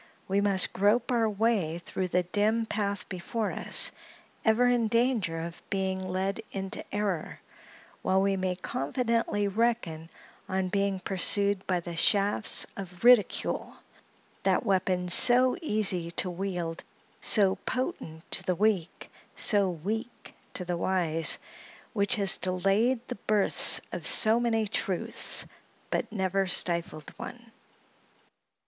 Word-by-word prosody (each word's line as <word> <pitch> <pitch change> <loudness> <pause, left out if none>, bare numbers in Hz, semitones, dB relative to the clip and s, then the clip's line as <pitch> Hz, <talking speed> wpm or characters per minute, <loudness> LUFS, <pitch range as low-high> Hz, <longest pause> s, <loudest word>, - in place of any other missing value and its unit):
We 195 +1 +1
must 195 -2 +1
grope 210 +6 +1
our 230 -3 +1
way 205 -6 0
through 185 +2 -4
the 180 0 0
dim 215 +5 0
path 200 -2 -3
before 200 +4 -4
us, - - +4 0.5
ever 220 +2 +3
in 245 -2 +2
danger 230 -7 0
of 170 +1 -8
being 190 -1 -2
led 190 +1 -3
into 195 -1 -5
error, 200 -6 -3 0.6
while 190 0 +1
we 195 0 +1
may 185 -1 -2
confidently 205 - -2
reckon 200 -7 -2 0.4
on 190 -1 -1
being 195 -1 -1
pursued 200 +1 +2
by 180 -2 0
the 170 0 -7
shafts 200 +5 +3
of 180 -1 -9
ridicule—that 245 +1 0
weapon 185 -2 0
so 250 +7 +6
easy 200 - 0
to 180 +2 -2
wield, 175 -3 -4 0.4
so 195 -3 +2
potent 210 - -4
to - - +1
the 185 - -1
weak, 200 -4 -1 0.3
so 200 -3 +2
weak 210 +8 -6 0.2
to 180 - -4
the 175 0 -3
wise—which 185 +5 0
has 200 -4 +4
delayed 195 +8 0
the - - -7
births 210 -2 +4
of - - -2
so 220 +1 +4
many 225 -2 0
truths, 195 -3 +1 0.5
but - - -2
never 195 -2 -1
stifled 170 -4 -2
one. 235 -2 -10
195 Hz, 125 wpm, -28 LUFS, 180-220 Hz, 0.6 s, so